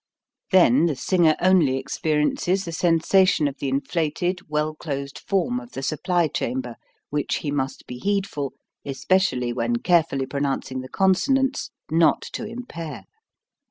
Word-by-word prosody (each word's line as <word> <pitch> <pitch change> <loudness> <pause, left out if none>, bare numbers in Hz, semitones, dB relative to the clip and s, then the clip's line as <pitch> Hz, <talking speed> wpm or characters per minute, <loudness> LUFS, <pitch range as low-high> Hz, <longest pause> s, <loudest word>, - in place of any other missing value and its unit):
Then 170 -5 +5
the 155 - -1
singer 165 +3 +3
only 175 -8 +4
experiences 155 +7 0
the 170 - -5
sensation 170 0 +3
of 140 0 -5
the 140 - -2
inflated, 165 +6 -1
well 150 +1 0
closed 140 -3 -5
form 240 +6 0
of 255 -1 -13
the 135 - -5
supply 170 +4 +1
chamber 125 -3 -3 0.4
which 145 0 -1
he 145 - -1
must 135 -2 -3
be 125 - -8
heedful, 195 -8 -1 0.3
especially 135 -3 0
when 120 -1 0
carefully 155 -1 +2
pronouncing 135 -1 -2
the 130 - -9
consonants, 265 - +1 0.2
not 165 0 +3
to - - -4
impair. 210 -9 -7
155 Hz, 135 wpm, -23 LUFS, 135-185 Hz, 0.4 s, Then